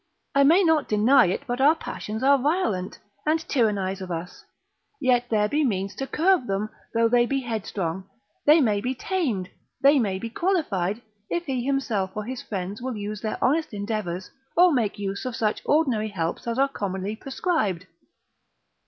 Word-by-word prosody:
I 280 - +5
may 335 +8 +6
not 320 -3 +3
deny 210 -3 +4
but 245 +2 -2
our 300 +4 +6
passions 220 -7 -6
are 280 +1 +5
violent, 245 - 0 0.3
and 310 +1 +2
tyrannise 200 -6 0
of 185 - -6
us, 175 +1 -6 0.6
yet 245 -2 +2
there 210 -2 +2
be 300 +7 +1
means 195 -6 -1
to 270 - -3
curb 330 0 +2
them; 200 +2 -2 0.2
though 230 0 +4
they 240 +1 +3
be 270 +1 0
headstrong, 195 -6 -4 0.4
they 305 +2 +7
may 210 -6 +2
be 255 +4 -2
tamed, 250 - -2 0.3
they 280 +1 +5
may 200 -5 0
be 230 +4 -6
qualified, 235 - -1 0.3
if 345 0 -2
he 260 -4 -2
himself 230 -8 -1
or 210 - -2
his 250 +3 -5
friends 195 +2 -5
will 255 0 -3
but 215 - -6
use 205 0 -5
their 215 - -3
honest 295 -3 +1
endeavours, 200 -4 -3 0.3
or 355 0 +7
make 225 -6 0
use 200 -1 -4
of 255 -2 -4
such 215 -2 0
ordinary 260 -8 +2
helps 170 +1 -3
as 230 0 -1
are 275 +1 +4
commonly 200 -4 -4
prescribed. 245 - -1
230 Hz, 175 wpm, -25 LUFS, 200-275 Hz, 0.6 s, they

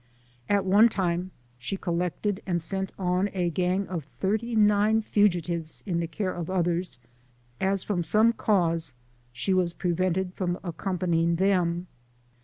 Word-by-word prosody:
At 200 -1 +2
one 205 +5 +6
time 180 -3 -1 0.3
she 130 +11 -3
collected 180 +3 -2
and 175 -2 +1
sent 190 +3 -3
on 185 +1 0
a 175 -3 0
gang 185 +3 0
of 170 -6 -4
thirty 220 +4 0
nine 210 +1 +4
fugitives 175 -6 0
in 175 -4 -1
the 170 - -1
care 185 +2 -3
of 170 -1 -5
others, 175 -2 -1 0.6
as 195 0 +1
from 195 -4 -1
some 215 +7 +4
cause 170 - +1 0.4
she 125 +11 -1
was 180 -2 +1
prevented 180 +1 -1
from 180 -2 -2
accompanying 170 -1 0
them. 180 -2 +1
185 Hz, 140 wpm, -27 LUFS, 170-195 Hz, 0.6 s, one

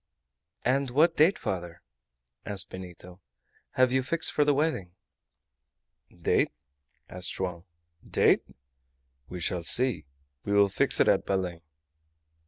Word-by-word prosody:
"And 135 +1 +1
what 160 +7 +3
date, 165 +7 +4
father," 85 -3 -5 0.6
asked 100 -2 -4
Benito, 90 0 -11 0.5
"have 130 -1 +3
you 130 - +2
fixed 160 +5 0
for 150 - +3
the 145 0 +3
wedding?" 125 - -1 1.2
"Date?" - - 0 0.6
answered 90 0 -2
Joam. 90 -2 -4 0.4
"Date? - - +3 0.9
We 90 - -7
shall 85 +1 -1
see. 120 -1 +3 0.4
We 100 - -2
will 100 -1 +4
fix - - +1
it - - +4
at - - +2
Belem." 90 -3 -2
100 Hz, 120 wpm, -27 LUFS, 90-130 Hz, 1.2 s, date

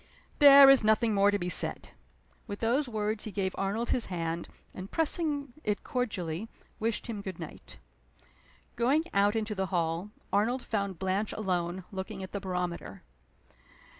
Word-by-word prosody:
"There 280 -1 +10
is 270 -3 +7
nothing 220 +1 +3
more 200 0 +4
to 205 - +1
be 175 - -4
said." 180 - +1 0.6
With 205 - -5
those 245 +5 +1
words 215 -1 -2
he 215 - -5
gave 190 -2 -2
Arnold 205 +5 -2
his 245 - 0
hand, 170 -2 -3 0.2
and, 185 +1 -8
pressing 300 -4 -1
it 210 -1 -2
cordially, 205 -6 -3 0.3
wished 225 0 -1
him 220 -4 -5
good 190 -3 -6
night. 155 - -10 1.0
Going 265 +7 +2
out 205 +2 +3
into 220 -1 -1
the 190 -2 -2
hall, 170 +1 -1 0.2
Arnold 235 +6 +1
found 200 -4 -2
Blanche 190 +3 -1
alone, 180 -3 -2
looking 190 0 -6
at 190 - -8
the 200 - -3
barometer. 180 - -4
205 Hz, 155 wpm, -29 LUFS, 185-230 Hz, 1.0 s, There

